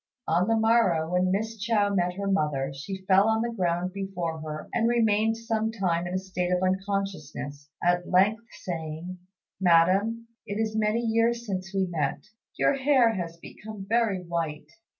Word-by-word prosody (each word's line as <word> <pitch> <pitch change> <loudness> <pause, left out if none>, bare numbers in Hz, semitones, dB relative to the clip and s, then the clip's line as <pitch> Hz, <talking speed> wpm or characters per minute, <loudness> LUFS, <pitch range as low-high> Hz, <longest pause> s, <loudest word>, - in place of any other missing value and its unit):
On 175 +4 +2
the 225 - +3
morrow 220 -8 +3
when 180 +1 +2
Miss 220 +3 -2
Chao 205 -1 +1
met 180 -2 +1
her 200 +1 -4
mother, 150 -8 0
she 190 +7 -7
fell 195 +2 +5
on 220 0 +2
the 235 0 -3
ground 180 -2 -1
before 180 -5 -4
her 155 0 -6
and 230 0 +2
remained 225 -1 +2
some 225 -1 -1
time 175 -5 -1
in 180 - -3
a - - +2
state 185 -1 -3
of 180 0 +1
unconsciousness, 185 -7 -3
at 175 0 +1
length 205 +5 +3 0.2
saying, 165 +1 -5 0.4
"Madam, 190 +6 +3 0.2
it 205 +1 -3
is 220 -1 -1
many 220 +1 +1
years 230 +1 +1
since 190 -2 -4
we 195 -1 +1
met; 155 -6 -2 0.3
your - - +3
hair 265 -4 +4
has 170 -4 -4
become 210 +3 -10
very 220 -4 +1
white." 165 -3 -4
190 Hz, 170 wpm, -27 LUFS, 175-220 Hz, 0.4 s, fell